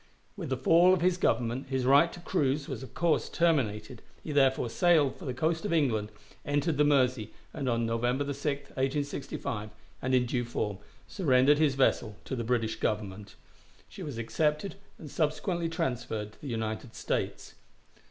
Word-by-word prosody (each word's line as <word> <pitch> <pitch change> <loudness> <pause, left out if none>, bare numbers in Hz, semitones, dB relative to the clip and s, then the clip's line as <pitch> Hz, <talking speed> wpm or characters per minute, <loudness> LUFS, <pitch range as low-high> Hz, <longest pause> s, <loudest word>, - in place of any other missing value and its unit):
With 175 -8 -6
the 130 - 0
fall 170 +8 +5
of 185 - -4
his 180 0 +2
Government 125 -5 0
his 130 -2 -1
right 140 +6 +5
to - - -10
cruise 145 -5 0
was - - -5
of 130 - -11
course 170 -2 +1
terminated; 130 -9 0 0.2
he 155 - -5
therefore 135 -3 +3
sailed 150 +2 +3
for 185 - -11
the 130 - -2
coast 160 +4 0
of - - -2
England, 120 -10 +1 0.3
entered 145 +2 0
the 150 - +5
Mersey, 130 -6 +2 0.2
and 140 -4 -2
on 115 -1 +1
November 120 +4 0
6, 140 0 -5 0.3
1865, 135 -5 -3 0.3
and 130 +1 +1
in 125 -1 +3
due 120 0 -1
form, 105 -4 -3 0.3
surrendered 145 -5 +3
his 150 -4 +3
vessel 120 -5 +1
to - - -3
the 120 - -3
British 115 -1 0
Government. 105 -1 -3 0.5
She - - -11
was 140 -6 -5
accepted 150 - 0 0.2
and 155 - -10
subsequently 170 +2 -1
transferred 125 - -3
to - - -23
the 145 - -7
United 110 -1 -4
States. - - -3
135 Hz, 170 wpm, -29 LUFS, 115-155 Hz, 0.5 s, fall